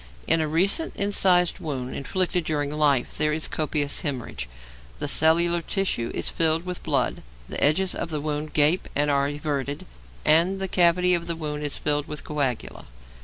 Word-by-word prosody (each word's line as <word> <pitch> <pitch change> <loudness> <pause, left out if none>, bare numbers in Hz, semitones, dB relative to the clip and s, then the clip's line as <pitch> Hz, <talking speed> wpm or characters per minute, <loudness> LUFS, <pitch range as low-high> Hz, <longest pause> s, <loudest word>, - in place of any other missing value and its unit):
In 165 - +3
a 155 - 0
recent 190 - +2
incised 185 -3 +3
wound 130 -5 -5
inflicted 180 +4 -1
during 145 -2 -2
life 145 -4 +1
there 150 0 +2
is 160 +1 0
copious 150 -2 -1
hæmorrhage, 125 - -4 0.5
the - - -3
cellular 170 +2 +3
tissue 175 - -1
is - - -1
filled 165 +1 0
with 180 -1 -5
blood, - - -1 0.3
the - - -3
edges 180 +6 +3
of - - -4
the 155 -2 -3
wound 150 0 -4
gape 155 +4 +3
and 145 +1 +2
are 140 0 +2
everted, 145 -1 -3 0.4
and 170 +5 +3
the 190 - -2
cavity 180 0 +3
of 170 -1 -1
the 170 - -2
wound 150 -2 -5
is 145 -1 0
filled 145 -1 -1
with 150 -1 -7
coagula. 140 -6 -3
155 Hz, 170 wpm, -24 LUFS, 145-175 Hz, 0.5 s, In